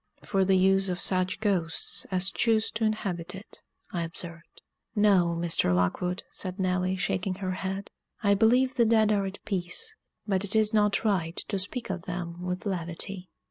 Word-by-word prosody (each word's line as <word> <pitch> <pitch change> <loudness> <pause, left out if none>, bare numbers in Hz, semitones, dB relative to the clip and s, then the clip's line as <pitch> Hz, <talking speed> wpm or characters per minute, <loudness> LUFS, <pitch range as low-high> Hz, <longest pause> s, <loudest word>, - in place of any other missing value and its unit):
"For 195 -2 +1
the 190 0 +3
use 195 +1 +3
of 180 0 -2
such 185 0 +2
ghosts 180 -6 0
as 185 0 +1
choose 225 -2 +1
to 220 +1 -3
inhabit 195 -5 -2
it," 195 +3 -6 0.3
I 175 - -2
observed. 170 0 -8 0.3
"No, 190 -5 +4
Mr. 165 - +2
Lockwood," 180 - 0
said 185 -1 -5
Nelly, 185 0 +1
shaking 185 0 -1
her 185 -1 -3
head. 190 +1 -4 0.3
"I 200 -1 +4
believe 250 +5 +4
the 240 -3 +3
dead 220 -1 +4
are 200 -2 +1
at 190 +1 -6
peace, 195 - -2 0.3
but 195 -2 0
it 205 +1 +3
is 215 0 +3
not 210 0 +2
right 175 -5 +1
to 195 - 0
speak 200 +3 -1
of 185 -2 -5
them 175 -1 -5
with 180 +2 -4
levity." 180 0 -1
190 Hz, 175 wpm, -28 LUFS, 180-205 Hz, 0.3 s, No